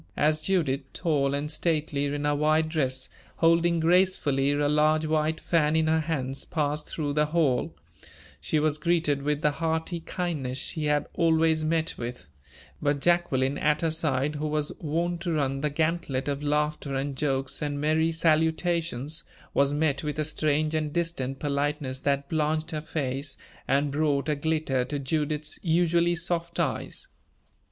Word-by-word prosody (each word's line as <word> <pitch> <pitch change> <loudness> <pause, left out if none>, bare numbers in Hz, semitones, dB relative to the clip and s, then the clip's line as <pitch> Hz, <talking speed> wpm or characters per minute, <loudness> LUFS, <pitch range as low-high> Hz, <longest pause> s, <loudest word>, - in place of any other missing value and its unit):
As 155 +1 +2
Judith, 155 -8 +1
tall 145 -4 +1
and 150 +2 -2
stately 155 -3 0
in 145 +1 -2
her 145 - +2
white 155 +2 +2
dress, 130 -5 -1 0.3
holding 170 +1 +3
gracefully 160 -5 +3
a 145 0 +1
large 155 +1 +3
white 155 0 0
fan 155 -2 +2
in 160 0 +3
her 160 0 +3
hands, 135 -4 -2
passed 150 -1 -2
through 145 -3 -2
the 150 +1 +2
hall, 150 -5 +1 0.6
she 155 - 0
was 150 0 +1
greeted 160 -3 +1
with 150 +1 -1
the 150 - +4
hearty 160 +2 -2
kindness 160 -7 -3
she 155 +3 -4
had 150 -1 +2
always 160 -1 +3
met 160 +1 -1
with; 120 -7 -6 0.5
but 145 -1 +1
Jacqueline 140 -5 +2
at 150 0 +2
her 165 - +2
side, 150 -2 0
who 155 +1 -2
was 150 0 -1
wont 170 +2 -1
to 170 -2 -1
run 135 -3 0
the 150 - +1
gantlet 155 -3 -1
of 140 0 -2
laughter 150 -1 -1
and 135 +1 -2
jokes 135 -1 -1
and 145 -1 -2
merry 160 +2 +2
salutations, 160 -2 0 0.3
was 140 0 +3
met 145 -1 0
with 150 -1 -3
a 155 - +1
strange 155 0 +1
and 155 -1 -1
distant 165 -6 -1
politeness 145 -2 -1
that 140 0 0
blanched 155 +1 0
her 155 -1 -3
face, 140 -2 -3 0.3
and 140 +1 +2
brought 145 -1 +1
a 150 - +1
glitter 150 -3 0
to 140 +4 -4
Judith's 150 +2 -2
usually 170 0 +2
soft 170 0 -2
eyes. 155 -6 -2
150 Hz, 160 wpm, -27 LUFS, 140-160 Hz, 0.6 s, the